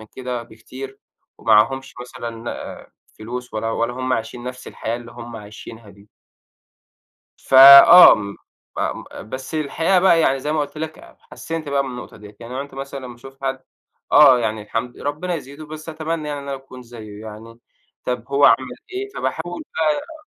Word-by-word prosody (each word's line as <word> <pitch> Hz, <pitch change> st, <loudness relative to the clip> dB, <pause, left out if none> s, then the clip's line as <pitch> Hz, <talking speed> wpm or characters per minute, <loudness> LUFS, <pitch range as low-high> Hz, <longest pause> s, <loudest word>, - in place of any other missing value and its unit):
من 110 Hz, -, -12 dB
كده 125 Hz, -2 st, -5 dB
بكتير 130 Hz, +4 st, -11 dB, 0.4 s
ومعاهمش 115 Hz, +5 st, +2 dB
مثلًا 120 Hz, -1 st, -7 dB
آآ -, -, -9 dB, 0.3 s
فلوس 125 Hz, +3 st, -7 dB
ولا 115 Hz, +1 st, -2 dB
ولا 115 Hz, +1 st, -1 dB
هم 130 Hz, +1 st, -3 dB
عايشين 120 Hz, +1 st, -4 dB
نَفْس 125 Hz, 0 st, -8 dB
الحياة 115 Hz, +1 st, -4 dB
اللي 120 Hz, -1 st, -11 dB
هم 120 Hz, -1 st, -9 dB
عايشينها 105 Hz, +1 st, -11 dB
دي. 100 Hz, +1 st, -20 dB, 1.3 s
ف -, -, -10 dB
آه، 140 Hz, +6 st, +11 dB
م 100 Hz, -2 st, -6 dB, 0.4 s
فم -, -, -3 dB
آآ -, -, -9 dB
بس 130 Hz, +8 st, -7 dB
الحقيقة 165 Hz, +5 st, +1 dB
بقى 175 Hz, -2 st, +4 dB
يعني 135 Hz, -4 st, +2 dB
زي 150 Hz, +3 st, -3 dB
ما 155 Hz, -, 0 dB
قُلت 145 Hz, +1 st, -4 dB
لك 160 Hz, 0 st, -6 dB
أب -, -, -17 dB
حسِّنْت 165 Hz, -2 st, -7 dB
بقى 140 Hz, 0 st, +1 dB
من 135 Hz, -, -6 dB
النقطة 125 Hz, -1 st, -9 dB
ديّة، 105 Hz, 0 st, -14 dB
يعني 120 Hz, +2 st, -9 dB
عُنت 140 Hz, +2 st, -6 dB
مثلًا 135 Hz, 0 st, -7 dB
لمّا 120 Hz, -1 st, -10 dB
أشوف 135 Hz, +3 st, -15 dB
حد 135 Hz, 0 st, -2 dB, 0.5 s
آه، 135 Hz, -4 st, +7 dB
يعني 110 Hz, -2 st, -2 dB
الحمد 115 Hz, +3 st, -5 dB
ربّنا 155 Hz, +5 st, -3 dB
يزيده، 145 Hz, 0 st, -9 dB
بس 155 Hz, +1 st, -9 dB
أتمنى 160 Hz, 0 st, -4 dB
يعني 145 Hz, -1 st, -4 dB
إن 140 Hz, -, -10 dB
أنا 140 Hz, -, -3 dB
أكون 130 Hz, -1 st, -13 dB
زيّه 110 Hz, -4 st, -11 dB
يعني، 110 Hz, +2 st, -11 dB, 0.5 s
طَب 125 Hz, -2 st, -2 dB
هو 140 Hz, +1 st, +3 dB
عمل -, -, +7 dB, 0.4 s
إيه؟ 395 Hz, +2 st, -4 dB
فباحاول 175 Hz, +2 st, -4 dB
بقى 160 Hz, -, -2 dB
130 Hz, 180 wpm, -20 LUFS, 115-145 Hz, 1.3 s, آه